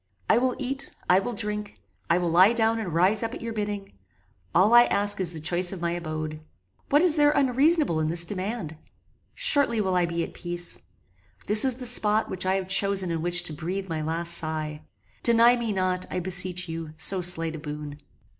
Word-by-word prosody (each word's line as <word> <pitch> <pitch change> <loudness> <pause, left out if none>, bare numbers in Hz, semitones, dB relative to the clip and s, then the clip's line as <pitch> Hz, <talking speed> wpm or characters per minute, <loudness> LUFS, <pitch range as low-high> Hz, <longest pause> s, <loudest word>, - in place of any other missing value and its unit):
I - - +3
will 255 0 -1
eat 270 +1 -3
I 180 +1 +4
will 240 +5 -5
drink 210 -1 -5 0.3
I 170 - +3
will 175 -2 -2
lie 185 +6 +5
down 225 -1 +1
and 200 -6 -5
rise 185 +6 +1
up 230 +1 -4
at - - -10
your 230 -1 -5
bidding 205 -2 -5 0.6
all 195 +6 +4
I 240 0 +7
ask 205 -1 +1
is 180 -3 +2
the 165 - -3
choice 175 +3 +1
of 195 - -7
my 170 0 -2
abode. 155 -2 -6 0.5
What 290 +4 +3
is 335 -3 +2
there 295 -1 +4
unreasonable 280 - +2
in 155 0 -1
this 170 +1 +3
demand? 185 -3 -5 0.6
Shortly 285 - +1
will 190 -3 -1
I 175 -1 +1
be 170 0 -3
at - - -8
peace. 175 0 -2 0.6
This 210 +1 +7
is 260 -2 +3
the 250 0 -7
spot 220 -2 +2
which 185 0 -3
I 190 - +1
have 190 -1 -3
chosen 195 -1 +1
in 165 -1 -3
which 175 +1 +3
to 155 - -1
breathe 185 +5 -5
my 160 -1 -3
last 165 +2 -3
sigh. 155 -1 -4 0.4
Deny 235 +1 +5
me 235 -2 -3
not, 185 -2 -2
I 185 - -3
beseech 180 0 -1
you, 165 -1 -7
so 190 +2 +3
slight 165 -2 +2
a - - -8
boon. 150 -1 -8
185 Hz, 205 wpm, -25 LUFS, 170-225 Hz, 0.6 s, I